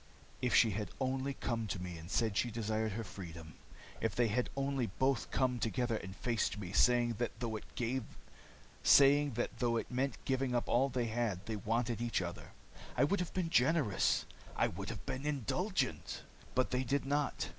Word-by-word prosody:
"If 125 -1 +2
she 115 - +6
had 105 +2 -3
only 135 +1 -1
come 115 -4 -2
to 95 - -3
me 90 -1 -5
and 80 +1 -9
said 110 +2 +1
she 120 - +2
desired 110 -1 -1
her 115 +3 -3
freedom. 85 -5 -9 0.5
If 110 -2 0
they 120 -2 +3
had 125 +4 0
only 135 -3 0
both 130 +5 0
come 125 -2 +1
together 120 +1 0
and 95 -2 -6
faced 115 -2 0
me, 95 -4 -5
saying 120 +1 +4
that 120 - -2
though 115 -3 -2 2.2
it - - -4
meant 130 +2 -1
giving 130 -1 0
up 120 - 0
all 130 +3 +3
they 125 -2 0
had, 110 -4 -1
they 110 - -3
wanted 115 +3 -1
only 120 - -1
each 115 - +1
other! 85 0 -7 0.4
I 125 - +5
would 190 +8 +2
have 180 - -3
been 175 -3 0
generous. 135 - +3 0.3
I - - +3
would 95 +3 -6
have 110 -2 -6
been 130 +2 -3
indulgent. 145 - -1 0.3
But 130 - +2
they 125 +1 +1
did 135 +2 0
not. 145 +1 0
120 Hz, 175 wpm, -35 LUFS, 105-130 Hz, 2.2 s, she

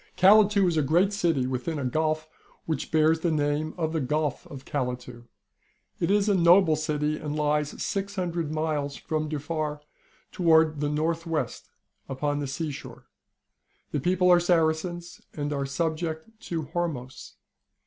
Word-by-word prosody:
Calatu 200 0 +6
is 170 -2 0
a - - +4
great 175 +8 +2
city, 165 -10 +1
within 130 +5 -3
a 140 - -3
gulf 155 +3 0 0.4
which 160 -4 -3
bears 160 0 +3
the 170 - 0
name 150 0 0
of 160 -2 -1
the 160 - 0
Gulf 150 +1 -1
of 140 -2 -10
Calatu. 125 -3 -4 0.7
It 170 - 0
is 205 +1 +3
a 205 - +4
noble 175 -2 +5
city, 150 -1 -1
and 150 -1 -4
lies 150 -1 0
600 180 -5 -2
miles 155 -3 -2
from 155 -1 -3
Dufar 150 0 -3 0.5
towards 160 -3 +3
the 145 0 0
north 160 +3 -1
west, 165 -2 -3 0.4
upon 145 +2 -1
the 145 - -3
sea 155 +3 -3
shore. 135 - -10 0.8
The 145 - -1
people 180 +4 +3
are 175 - +7
Saracens, 170 0 0
and 145 0 -2
are 140 -1 -2
subject 160 +4 -3 0.2
to 165 -2 -2
Hormos. 145 -5 -5
155 Hz, 150 wpm, -26 LUFS, 145-170 Hz, 0.8 s, are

